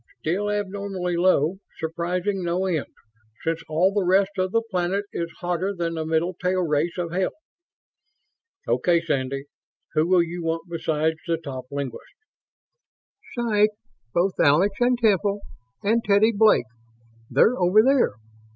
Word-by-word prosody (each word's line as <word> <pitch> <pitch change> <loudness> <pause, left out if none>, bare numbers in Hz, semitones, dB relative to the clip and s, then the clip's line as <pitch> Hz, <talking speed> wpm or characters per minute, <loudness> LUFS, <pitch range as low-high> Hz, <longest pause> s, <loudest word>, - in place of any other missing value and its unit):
"Still 195 +6 -1
abnormally 200 -3 -2
low. 175 0 +2 0.2
Surprising 175 +4 -2
no 175 +2 0
end, 165 -6 -1 0.6
since 165 0 -1
all 175 +5 +2
the 205 -1 +1
rest 190 +2 +3
of 185 0 0
the 230 +1 +1
planet 185 +2 0
is 170 -1 -3
hotter 180 +3 -1
than 170 -2 -2
the 160 -1 -3
middle 165 +3 0
tail 180 +1 0
race 160 +2 0
of 175 -2 -3
hell." 185 +1 0 1.4
"Okay, 175 -1 +2
Sandy. 135 -4 -2 0.5
Who 155 +2 +2
will 180 -1 +4
you 170 +1 -6
want 165 0 -1
besides 160 -1 -1
the 165 -1 +1
top 135 -5 -7
linguists?" 140 -4 -6 1.2
"Psych 215 -3 +3 0.4
both 180 +6 +1
Alex 175 +8 +4
and 245 0 +3
Temple. 205 -3 +2 0.4
And 225 +3 +2
Teddy 205 +2 +4
Blake. 215 - +4 0.6
They're 245 - +4
over 185 +4 +5
there. 265 - +3
180 Hz, 140 wpm, -24 LUFS, 165-200 Hz, 1.4 s, over